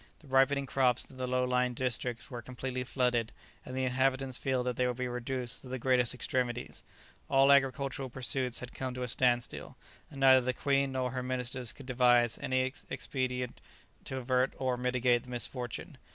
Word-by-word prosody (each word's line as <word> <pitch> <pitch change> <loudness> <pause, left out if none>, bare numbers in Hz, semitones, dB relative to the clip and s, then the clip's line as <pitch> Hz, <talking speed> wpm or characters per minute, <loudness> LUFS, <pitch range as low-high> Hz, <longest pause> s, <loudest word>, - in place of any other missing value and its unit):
The 155 - -18
ripening 135 +1 +3
crops 125 -2 +2
in 130 - -15
the 130 0 -2
low 125 0 +1
lying 125 0 +1
districts 125 +1 -2
were 120 -1 -5
completely 130 +1 -4
flooded, 125 -3 0 0.3
and 130 - -7
the 130 - 0
inhabitants 130 0 +1
feared 130 -2 0
that 125 -1 -1
they 125 +1 +1
would 125 -1 -2
be 125 -1 -1
reduced 125 +1 -3
to - - -12
the 130 +1 -3
greatest 125 -1 +2
extremities; 125 -1 -2 0.5
all 135 +1 +5
agricultural 135 -1 +2
pursuits 125 0 -2
had 125 - -8
come 130 -1 -4
to 125 - -3
a - - -2
standstill, 120 -1 0 0.3
and 140 - -10
neither 130 -1 +7
the 130 +1 -1
queen 140 0 +1
nor 130 -1 -1
her 130 -1 -3
ministers 125 -1 -3
could 140 - -13
devise 120 -2 +3
any 130 -2 +1 0.3
expedient 125 -2 -3 0.4
to 130 - -4
avert 130 0 +1
or 130 -1 0
mitigate 125 -1 +2
the - - -13
misfortune. 120 0 -3
125 Hz, 180 wpm, -31 LUFS, 125-130 Hz, 0.5 s, neither